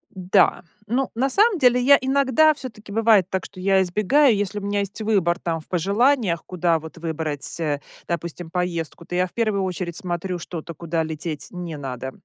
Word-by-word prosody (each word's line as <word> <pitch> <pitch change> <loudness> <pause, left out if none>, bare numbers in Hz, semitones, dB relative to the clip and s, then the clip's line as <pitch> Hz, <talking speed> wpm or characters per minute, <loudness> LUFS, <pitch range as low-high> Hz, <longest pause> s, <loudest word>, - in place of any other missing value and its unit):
Да. 185 +1 +3 0.3
Ну, 260 +3 0
на 265 +4 0
самом 420 - +4
деле 250 -2 +4
я 280 +3 +7
иногда, 275 +3 +4
всё-таки, 215 -7 -10
бывает 215 -4 +3
так, 190 - -2
что 185 - -11
я 190 0 +3
избегаю, 210 +8 +3
если 205 +1 -2
у - - -7
меня 205 0 -1
есть 200 +2 -5
выбор, 190 -6 +1
там, 165 -2 -2
в - - -16
пожеланиях, 200 - +1
куда 170 -2 +1
вот 160 0 -11
выбрать, 160 -1 -3
э, 145 -3 -1 0.3
допустим, 170 0 -4
поездку, 170 -2 -3
то 175 - -6
я 180 +1 +2
в - - -16
1 215 -4 0
очередь 180 -2 -3
смотрю 180 -2 -3
что-то, 170 0 -7
куда 165 0 -2
лететь 155 -1 -5
не 175 -3 -6
надо. 130 -1 -5
185 Hz, 185 wpm, -23 LUFS, 170-220 Hz, 0.3 s, я